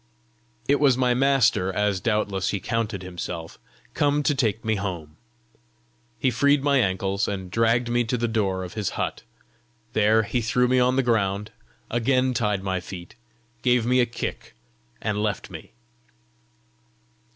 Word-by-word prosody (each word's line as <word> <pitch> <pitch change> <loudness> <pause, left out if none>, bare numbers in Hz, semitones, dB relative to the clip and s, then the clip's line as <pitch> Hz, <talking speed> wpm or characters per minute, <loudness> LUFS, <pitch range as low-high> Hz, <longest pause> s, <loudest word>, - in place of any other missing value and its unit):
It 140 +1 +3
was 135 -4 +4
my 125 -1 +3
master, 125 -8 +3
as 105 -1 0
doubtless 105 -4 0
he 100 - -1
counted 105 -2 -2
himself, 85 -2 -6 0.3
come 145 0 +1
to 145 - +2
take 115 -5 -1
me 110 - +2
home. 85 -6 -5 1.0
He 130 +3 +1
freed 140 +4 +3
my 140 -2 +3
ankles, 95 -2 0
and 95 -3 -4
dragged 115 +3 +2
me 120 0 +1
to 125 +2 -1
the 120 0 0
door 100 -5 -1
of 90 - -8
his 105 -4 -2
hut; - - -2 0.7
there 110 +1 +4
he 120 +4 -1
threw 125 +2 +2
me 130 +1 +3
on 125 +1 +3
the 135 - +2
ground, 105 -3 0 0.4
again 130 +2 +2
tied 105 -5 0
my 95 -1 -1
feet, 85 -1 -9 0.5
gave 125 -2 +2
me 125 +1 +3
a 120 - +3
kick, 120 - -6 0.5
and 105 -1 -1
left 105 -2 -2
me. - - -10
110 Hz, 155 wpm, -24 LUFS, 100-125 Hz, 1.0 s, was